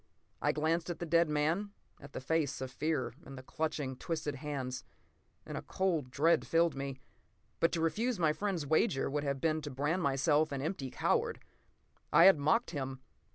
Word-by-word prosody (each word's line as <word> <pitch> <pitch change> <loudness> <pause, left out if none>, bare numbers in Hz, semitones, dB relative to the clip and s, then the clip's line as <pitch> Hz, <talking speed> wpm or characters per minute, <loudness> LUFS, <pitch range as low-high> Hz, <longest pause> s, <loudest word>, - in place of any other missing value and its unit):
I 145 - +3
glanced 160 +3 0
at 175 - -3
the 175 - -4
dead 170 0 +3
man, 160 +8 0 0.3
at 140 0 -13
the - - -4
face 150 0 0
of 130 -1 -5
fear 155 -1 -1
and 135 - -10
the 130 - -9
clutching, 145 -2 -3
twisted 155 -2 -3
hands, 130 -3 -4 0.6
and - - -6
a - - -3
cold 170 -8 -1
dread 155 +6 +2
filled 165 -1 +3
me. 135 -1 -4 0.6
But 165 - +3
to 165 - 0
refuse 225 +9 0
my 160 -3 +2
friend's 190 -4 -2
wager 155 -1 +1
would 145 0 -1
have 140 -1 -1
been 155 +1 +1
to 150 - -5
brand 145 +7 -1
myself 145 +2 +2
an 140 - -2
empty 150 -5 -3
coward. - - 0 0.7
I 170 - +7
had 190 -4 +8
mocked 195 +12 +2
him. 135 -4 -4
155 Hz, 185 wpm, -33 LUFS, 140-165 Hz, 0.7 s, had